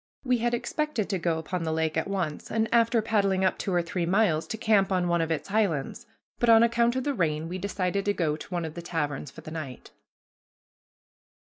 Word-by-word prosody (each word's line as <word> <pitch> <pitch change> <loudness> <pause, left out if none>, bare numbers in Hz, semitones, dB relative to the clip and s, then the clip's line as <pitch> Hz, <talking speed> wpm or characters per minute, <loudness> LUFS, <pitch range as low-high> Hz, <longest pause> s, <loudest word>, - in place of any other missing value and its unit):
We 250 -2 +1
had 240 +1 +1
expected 270 -4 -2
to 190 - 0
go 165 -1 0
upon 165 +3 -4
the 160 -1 -2
lake 160 0 0
at 160 - 0
once, 185 -6 -3
and, 225 0 +1
after 230 -1 +3
paddling 200 -4 +1
up 185 - +1
two 195 - -2
or 175 -1 +2
three 170 0 -2
miles, 180 -4 +2
to 220 - -4
camp 205 -3 +2
on 180 -2 +1
one 170 -1 +2
of 165 - -1
its 165 +4 -3
islands, 190 -10 -1 0.3
but 240 - +2
on 225 0 +8
account 235 +1 +2
of 260 - -1
the 285 - 0
rain 160 - -1
we 180 +2 -5
decided 195 0 -1
to 205 - +2
go 155 -4 0
to 155 - -10
one 175 -3 -2
of 160 - -6
the 170 - -7
taverns 150 -4 -3
for - - -12
the 155 - -9
night. 155 -6 -7
185 Hz, 225 wpm, -27 LUFS, 160-220 Hz, 0.3 s, on